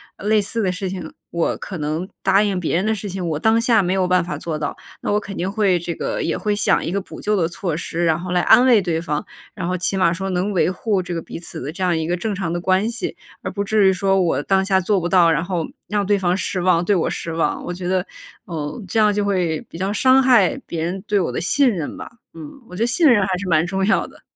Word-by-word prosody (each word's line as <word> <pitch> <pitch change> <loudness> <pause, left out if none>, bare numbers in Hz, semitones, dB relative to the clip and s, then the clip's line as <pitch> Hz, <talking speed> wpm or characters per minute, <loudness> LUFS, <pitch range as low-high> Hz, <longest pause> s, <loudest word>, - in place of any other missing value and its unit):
呃， - - -11
类 215 -1 +4
似 220 +3 -1
的 185 - +1
事 185 0 -4
情， 180 -4 -6 0.2
我 170 -1 0
可 190 -4 -7
能 155 +4 -2 0.2
答 195 +1 +4
应 200 -3 0
别 170 -1 0
人 190 - 0
的 220 0 +1
事 205 -1 -6
情， 185 -1 -4
我 155 - -1
当 220 +6 +3
下 230 -2 +3
没 180 +1 0
有 190 -1 +1
办 180 -1 +3
法 175 - -5
做 160 -2 -4
到， 150 -1 -4 0.2
那 - - -2
我 210 - +2
肯 205 -1 -8
定 185 +2 -2
会 200 -4 +2
这 170 0 -4
个 - - -3
也 165 - -1
会 210 -1 -1
想 210 - +2
一 170 - -3
个 200 - 0
补 - - -11
救 210 - 0
的 180 -5 +2
措 170 -1 -3
施， 170 +1 -2
然 160 -1 +2
后 180 +1 -6
来 180 - +2
安 245 - +6
慰 235 -6 +5
对 165 -3 -1
方。 150 -3 -3 0.3
然 180 -4 -4
后 185 - -1
起 190 +2 -1
码 170 -3 +3
说 190 +2 -4
能 185 +3 -1
维 180 - +2
护 200 0 -1
这 180 - -5
个 165 - -3
彼 - - -8
此 170 - -7
的 145 +5 -5
这 190 - -4
样 175 -3 +2
一 160 - -2
个 175 - 0
正 210 +4 -3
常 185 -4 -3
的 175 - -2
关 190 +4 +2
系， 235 - -4 0.2
而 - - -4
不 200 +1 -3
至 205 -2 +4
于 - - +4
说 195 +1 +1
我 165 -6 +1
当 190 -1 +2
下 190 -1 +2
做 195 +2 +1
不 175 - -2
到， 175 -3 +5
然 165 +2 +1
后 175 -3 -2 0.2
让 205 -1 0
对 205 0 +2
方 180 -1 +1
失 185 -1 -2
望， 175 -2 +3
对 205 - +3
我 170 - +1
失 165 - -4
望。 165 - -1
我 175 - -4
觉 180 0 -5
得， 185 0 0 0.4
呃， 160 +5 -5
这 220 - 0
样 210 -1 +4
就 205 0 0
会 180 -6 0
比 - - -9
较 190 +3 -1
伤 260 +5 +4
害 245 -5 +4
别 165 -1 -4
人 180 +3 -3
对 205 - +2
我 180 - -1
的 - - -3
信 270 +9 +3
任 175 -9 -4
吧。 - - -8 0.2
嗯， 160 -3 -9 0.2
我 180 - -9
觉 200 - -5
得 235 - +2
信 325 +7 +2
任 220 -7 +5
还 185 -2 0
是 185 0 -5
蛮 160 -1 +3
重 190 +1 -1
要 220 - +2
的。 - - -18
185 Hz, 310 characters per minute, -20 LUFS, 170-205 Hz, 0.4 s, 安